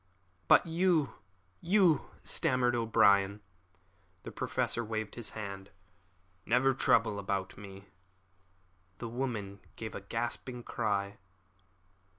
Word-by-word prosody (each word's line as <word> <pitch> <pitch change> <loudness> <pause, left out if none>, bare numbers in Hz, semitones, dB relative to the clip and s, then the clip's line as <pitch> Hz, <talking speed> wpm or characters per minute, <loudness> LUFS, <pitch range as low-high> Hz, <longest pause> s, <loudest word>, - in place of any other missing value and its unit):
"But - - +6
you 165 -3 +2 0.5
you 180 -4 +3
" - - -25
stammered 125 -1 +1
O'Brien. 100 -3 +3 0.8
The - - -7
Professor 120 - -1
waved 110 -1 -4
his 120 -2 -5
hand. 100 -2 -6 0.7
"Never 125 +5 +3
trouble 115 -5 +2
about 95 -1 -3
me," 100 0 -10
he 95 0 -11
said. 100 - -23 1.1
The 120 - -6
woman 115 -6 -4 0.2
gave 110 -1 -6
a - - -6
gasping 120 +3 -4
cry. 100 -2 -2
115 Hz, 115 wpm, -31 LUFS, 100-125 Hz, 1.1 s, But